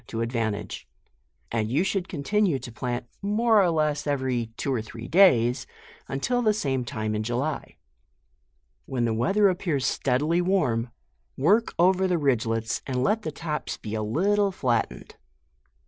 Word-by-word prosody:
143 115 Hz, -, -4 dB
to 115 Hz, -, 0 dB
advantage; 110 Hz, -4 st, -3 dB, 0.6 s
and 110 Hz, -2 st, -1 dB
you 145 Hz, +9 st, +2 dB
should 195 Hz, -1 st, -1 dB
continue 175 Hz, +2 st, +1 dB
to 120 Hz, -, -8 dB
plant 120 Hz, +1 st, -3 dB, 0.2 s
more 215 Hz, +2 st, +3 dB
or 180 Hz, -, +3 dB
less 155 Hz, -2 st, 0 dB
every 130 Hz, -4 st, 0 dB
two 135 Hz, -, -1 dB
or 120 Hz, -, 0 dB
three 115 Hz, +1 st, -9 dB
days, 130 Hz, -9 st, +4 dB, 0.4 s
until 245 Hz, -, -1 dB
the 215 Hz, -3 st, +2 dB
same 135 Hz, -, -1 dB
time 110 Hz, -3 st, -3 dB
in 105 Hz, -, -1 dB
July, 125 Hz, +7 st, -3 dB, 1.1 s
When 120 Hz, -2 st, -1 dB
the 115 Hz, -, 0 dB
weather 195 Hz, -, +3 dB
appears 170 Hz, -7 st, 0 dB
steadily 150 Hz, +7 st, +1 dB
warm, 145 Hz, -11 st, +1 dB, 0.5 s
work 205 Hz, -, +2 dB
over 185 Hz, +2 st, +4 dB
the 180 Hz, -1 st, +1 dB
ridglels, 115 Hz, -6 st, 0 dB
and 130 Hz, -2 st, -1 dB
let 215 Hz, +6 st, +1 dB
the 155 Hz, -, -4 dB
tops 150 Hz, 0 st, -4 dB
be 105 Hz, -, -7 dB
a 110 Hz, -, -1 dB
little 195 Hz, -, +1 dB
flatened. 125 Hz, -10 st, -2 dB
140 Hz, 155 wpm, -26 LUFS, 120-185 Hz, 1.1 s, days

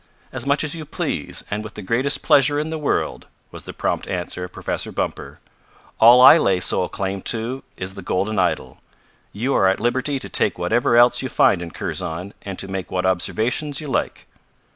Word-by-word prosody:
"As 130 Hz, 0 st, -5 dB
much 140 Hz, +2 st, +2 dB
as 155 Hz, +1 st, -2 dB
you 160 Hz, -, -6 dB
please, 150 Hz, -, -3 dB
and 105 Hz, +1 st, -2 dB
with 110 Hz, -, -10 dB
the 105 Hz, -, -7 dB
greatest 125 Hz, +8 st, 0 dB
pleasure 145 Hz, +1 st, +4 dB
in 155 Hz, +2 st, -2 dB
the 160 Hz, -, -3 dB
world," 145 Hz, -, -2 dB, 0.2 s
was -, -, -9 dB
the -, -, -7 dB
prompt -, -, -2 dB
answer 90 Hz, 0 st, -4 dB
of 90 Hz, -, -7 dB
Professor -, -, -3 dB
Bumper. -, -, -4 dB, 0.6 s
"All 120 Hz, +2 st, +8 dB
I 160 Hz, +5 st, +9 dB
lay 95 Hz, -10 st, +2 dB
sole -, -, +1 dB
claim 95 Hz, 0 st, -4 dB
to 120 Hz, +4 st, -3 dB, 0.2 s
is 95 Hz, +1 st, -5 dB
the 100 Hz, -, -9 dB
golden 95 Hz, +3 st, -1 dB
idol. 85 Hz, -8 st, -1 dB, 0.5 s
You 125 Hz, +7 st, -2 dB
are 95 Hz, -, +3 dB
at 95 Hz, -, +1 dB
liberty 130 Hz, +4 st, 0 dB
to -, -, -7 dB
take -, -, -1 dB
whatever 120 Hz, 0 st, +1 dB
else 120 Hz, 0 st, +5 dB
you 130 Hz, -, -4 dB
find 90 Hz, -, +3 dB
in 85 Hz, -, -6 dB
Kurzon 85 Hz, +4 st, -5 dB
and 95 Hz, -2 st, -7 dB
to 95 Hz, -, -4 dB
make 95 Hz, -2 st, -5 dB
what 90 Hz, 0 st, -2 dB
observations 115 Hz, -, 0 dB
you 150 Hz, -, -6 dB
like." -, -, -2 dB
115 Hz, 200 wpm, -21 LUFS, 95-135 Hz, 0.6 s, I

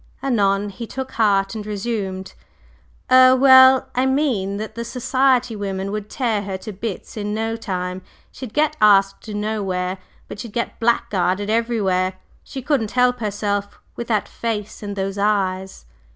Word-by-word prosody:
Anon 205 Hz, -6 st, +1 dB
he 230 Hz, +4 st, -8 dB
took 265 Hz, +2 st, -6 dB
heart 200 Hz, -4 st, +2 dB
and 220 Hz, -2 st, -5 dB
resumed: 200 Hz, -3 st, -4 dB, 0.8 s
"Er 255 Hz, 0 st, +8 dB
well 260 Hz, 0 st, +7 dB
I 255 Hz, +1 st, +1 dB
mean 250 Hz, -9 st, 0 dB
that 215 Hz, +1 st, -6 dB
the 235 Hz, -, -5 dB
society 255 Hz, 0 st, +1 dB
women 195 Hz, -1 st, -4 dB
would 210 Hz, 0 st, -5 dB
tear 230 Hz, -6 st, -1 dB
her 195 Hz, -1 st, -4 dB
to 210 Hz, +3 st, -8 dB
bits 205 Hz, +1 st, -6 dB
in 210 Hz, 0 st, -3 dB
no 225 Hz, +1 st, -2 dB
time. 185 Hz, -4 st, -4 dB, 0.3 s
She'd 255 Hz, -4 st, -8 dB
get 305 Hz, +3 st, +1 dB
asked 195 Hz, 0 st, +4 dB
nowhere, 195 Hz, -3 st, -2 dB, 0.3 s
but -, -, -9 dB
she'd 230 Hz, -2 st, -8 dB
get 235 Hz, -, -3 dB
blackguarded 205 Hz, -4 st, 0 dB
everywhere; 205 Hz, -5 st, 0 dB, 0.3 s
she 265 Hz, -2 st, -8 dB
couldn't 255 Hz, -6 st, 0 dB
help 250 Hz, 0 st, +3 dB
herself 205 Hz, -1 st, -3 dB, 0.2 s
with 235 Hz, -, -6 dB
that 215 Hz, -3 st, 0 dB
face 215 Hz, -3 st, -4 dB
and 205 Hz, -1 st, -5 dB
those 195 Hz, 0 st, -3 dB
eyes." 190 Hz, -, -1 dB
210 Hz, 150 wpm, -21 LUFS, 195-240 Hz, 0.8 s, Er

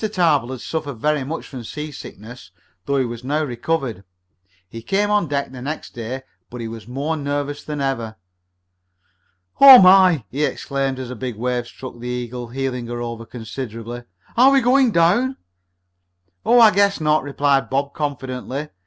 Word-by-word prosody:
Tarbill 170 Hz, -, +1 dB
had 130 Hz, -2 st, -6 dB
suffered 155 Hz, -4 st, -4 dB
very 150 Hz, +3 st, 0 dB
much 155 Hz, +5 st, -5 dB
from 130 Hz, -3 st, -8 dB
seasickness, 125 Hz, -6 st, -9 dB, 0.4 s
though 140 Hz, -, +1 dB
he 130 Hz, -, +1 dB
was 120 Hz, 0 st, -7 dB
now 150 Hz, +4 st, 0 dB
recovered. 125 Hz, -, -3 dB, 0.6 s
He 115 Hz, +4 st, -9 dB
came 205 Hz, -, 0 dB
on 210 Hz, -5 st, +2 dB
deck 140 Hz, -2 st, -2 dB
the 130 Hz, -1 st, -9 dB
next 150 Hz, +4 st, -5 dB
day, 120 Hz, +3 st, -6 dB, 0.3 s
but 125 Hz, -, -8 dB
he 115 Hz, -, -4 dB
was 110 Hz, -2 st, -9 dB
more 140 Hz, +6 st, -2 dB
nervous 145 Hz, 0 st, -3 dB
than 150 Hz, -1 st, -5 dB
ever. 120 Hz, -5 st, -2 dB, 1.4 s
"Oh, 270 Hz, -2 st, +11 dB
my!" 185 Hz, -, +6 dB
he 145 Hz, +4 st, -1 dB
exclaimed 135 Hz, -2 st, -2 dB
as 130 Hz, -1 st, -6 dB
a -, -, -6 dB
big 125 Hz, 0 st, -5 dB
wave 120 Hz, +1 st, -2 dB
struck 130 Hz, -1 st, -10 dB
the 120 Hz, -, -7 dB
Eagle, 125 Hz, 0 st, -4 dB
heeling 125 Hz, -1 st, -4 dB
her 120 Hz, 0 st, -5 dB
over 115 Hz, -1 st, -6 dB
considerably. 115 Hz, 0 st, -7 dB, 0.3 s
"Are 255 Hz, +3 st, +7 dB
we 275 Hz, 0 st, +5 dB
going 255 Hz, +1 st, +4 dB
down?" 210 Hz, +9 st, +2 dB, 1.1 s
"Oh, 240 Hz, +1 st, +5 dB
I 225 Hz, -2 st, +8 dB
guess 200 Hz, 0 st, +2 dB
not," 155 Hz, -1 st, +2 dB
replied 140 Hz, 0 st, +1 dB
Bob 140 Hz, +1 st, -1 dB
confidently. 140 Hz, -1 st, -4 dB
135 Hz, 165 wpm, -21 LUFS, 120-155 Hz, 1.4 s, Oh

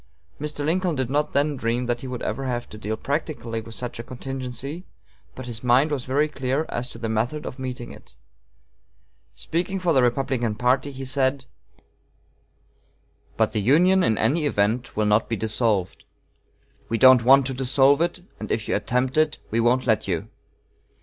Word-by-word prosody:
Mr. 150 Hz, 0 st, -3 dB
Lincoln 175 Hz, +1 st, 0 dB
did 130 Hz, -2 st, -2 dB
not 150 Hz, +2 st, 0 dB
then 145 Hz, +1 st, +1 dB
dream 120 Hz, 0 st, -1 dB
that 120 Hz, 0 st, -2 dB
he 130 Hz, -, -6 dB
would 125 Hz, -1 st, -5 dB
ever 135 Hz, -, -3 dB
have 120 Hz, -2 st, -3 dB
to -, -, -10 dB
deal 110 Hz, +1 st, -3 dB
practically 140 Hz, -6 st, -3 dB
with 115 Hz, 0 st, -10 dB
such 125 Hz, -2 st, -5 dB
a -, -, -4 dB
contingency, 135 Hz, +5 st, -6 dB, 0.5 s
but 130 Hz, -, -7 dB
his 115 Hz, -1 st, -5 dB
mind 130 Hz, +5 st, +3 dB
was 135 Hz, -4 st, -2 dB
very 145 Hz, +4 st, +1 dB
clear 135 Hz, +1 st, -2 dB
as 125 Hz, +1 st, -2 dB
to -, -, -10 dB
the 115 Hz, -, -4 dB
method 120 Hz, +8 st, -1 dB
of 130 Hz, -, -7 dB
meeting 125 Hz, -2 st, -5 dB
it. -, -, -15 dB, 1.2 s
Speaking 180 Hz, +4 st, -2 dB
for 175 Hz, -2 st, +1 dB
the 130 Hz, -, +4 dB
Republican 120 Hz, -2 st, 0 dB
party, 130 Hz, +5 st, +1 dB
he 135 Hz, 0 st, -7 dB
said: 130 Hz, 0 st, 0 dB, 1.9 s
"But -, -, +2 dB
the 105 Hz, -, -1 dB
Union 175 Hz, -, +4 dB
in 110 Hz, -, +2 dB
any 145 Hz, +8 st, +1 dB
event 110 Hz, 0 st, 0 dB
will 110 Hz, -, +2 dB
not 105 Hz, +1 st, +2 dB
be 115 Hz, -, 0 dB
dissolved. 110 Hz, -3 st, -1 dB, 0.9 s
We 115 Hz, -, 0 dB
don't 130 Hz, -1 st, +7 dB
want 135 Hz, +2 st, +6 dB
to 135 Hz, -, -2 dB
dissolve 135 Hz, +3 st, +3 dB
it, 175 Hz, +1 st, -1 dB, 0.2 s
and 110 Hz, -, -6 dB
if 110 Hz, -, -1 dB
you -, -, 0 dB
attempt 125 Hz, +7 st, 0 dB
it, 155 Hz, -1 st, +2 dB
we 115 Hz, -, +1 dB
won't 120 Hz, +2 st, +2 dB
let 110 Hz, -3 st, +1 dB
you. 85 Hz, -4 st, -2 dB
130 Hz, 180 wpm, -24 LUFS, 115-140 Hz, 1.9 s, don't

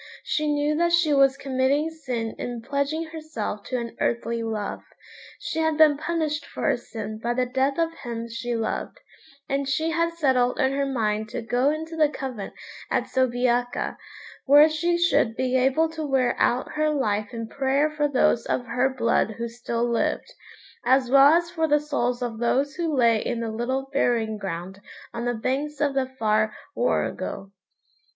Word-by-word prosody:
She 305 Hz, -1 st, 0 dB
knew 295 Hz, +1 st, +1 dB
that 340 Hz, +1 st, +2 dB
she 345 Hz, -3 st, +4 dB
was 275 Hz, -1 st, +4 dB
committing 275 Hz, +3 st, 0 dB
sin 250 Hz, -8 st, -4 dB
in 240 Hz, -2 st, -5 dB
pledging 280 Hz, +4 st, -1 dB
herself 310 Hz, -10 st, -5 dB
to 255 Hz, -, -2 dB
an 235 Hz, -1 st, -5 dB
earthly 230 Hz, 0 st, 0 dB
love. 220 Hz, -2 st, -3 dB, 0.6 s
She 320 Hz, -, -3 dB
had 320 Hz, -1 st, +1 dB
been 310 Hz, -2 st, +6 dB
punished 310 Hz, -1 st, -2 dB
for -, -, -8 dB
her 285 Hz, -, +3 dB
sin 220 Hz, -3 st, -7 dB
by 240 Hz, +2 st, -1 dB
the 255 Hz, 0 st, +1 dB
death 265 Hz, +2 st, 0 dB
of 330 Hz, 0 st, 0 dB
him 235 Hz, -6 st, -6 dB
she 235 Hz, +1 st, -4 dB
loved, 225 Hz, -, -3 dB, 0.5 s
and 275 Hz, 0 st, -1 dB
she 315 Hz, +4 st, 0 dB
had 335 Hz, +1 st, 0 dB
settled 260 Hz, -6 st, +1 dB
in 265 Hz, -2 st, +3 dB
her 275 Hz, 0 st, 0 dB
mind 220 Hz, -4 st, -1 dB
to 240 Hz, 0 st, -5 dB
go 245 Hz, +4 st, +2 dB
into 320 Hz, +2 st, -4 dB
the 310 Hz, -2 st, +3 dB
convent 255 Hz, -8 st, -6 dB, 0.3 s
at -, -, -1 dB
Soubiaca, 245 Hz, -1 st, 0 dB, 0.5 s
where 290 Hz, +3 st, +8 dB
she 340 Hz, +2 st, 0 dB
should 340 Hz, -9 st, +2 dB
be 255 Hz, 0 st, 0 dB
able 265 Hz, +5 st, +3 dB
to 320 Hz, -1 st, -5 dB
wear 265 Hz, -4 st, +1 dB
out 245 Hz, +2 st, +1 dB
her 305 Hz, 0 st, +1 dB
life 215 Hz, -8 st, -1 dB
in 230 Hz, -1 st, -5 dB
prayer 275 Hz, +4 st, +1 dB
for 295 Hz, -1 st, 0 dB
those 255 Hz, -4 st, +2 dB
of 245 Hz, -, -1 dB
her 255 Hz, +2 st, +1 dB
blood 230 Hz, -4 st, +1 dB
who 235 Hz, 0 st, -3 dB
still 235 Hz, 0 st, -2 dB
lived, 235 Hz, -1 st, -1 dB, 0.5 s
as 255 Hz, 0 st, +3 dB
well 275 Hz, +2 st, +8 dB
as 340 Hz, 0 st, +1 dB
for 320 Hz, -2 st, 0 dB
the 295 Hz, 0 st, +4 dB
souls 250 Hz, -5 st, -1 dB
of 230 Hz, -2 st, -4 dB
those 270 Hz, +4 st, +1 dB
who 330 Hz, 0 st, -2 dB
lay 235 Hz, -6 st, +3 dB
in 240 Hz, -, -2 dB
the 230 Hz, -1 st, -3 dB
little 260 Hz, +4 st, -2 dB
burying 225 Hz, -5 st, +1 dB
ground 190 Hz, +1 st, -6 dB, 0.3 s
on 235 Hz, +1 st, -4 dB
the 245 Hz, 0 st, 0 dB
banks 275 Hz, +6 st, -2 dB
of 290 Hz, -2 st, +1 dB
the 270 Hz, -1 st, 0 dB
far 215 Hz, -4 st, 0 dB, 0.2 s
Warrego. 195 Hz, 0 st, -1 dB
260 Hz, 180 wpm, -25 LUFS, 235-300 Hz, 0.6 s, where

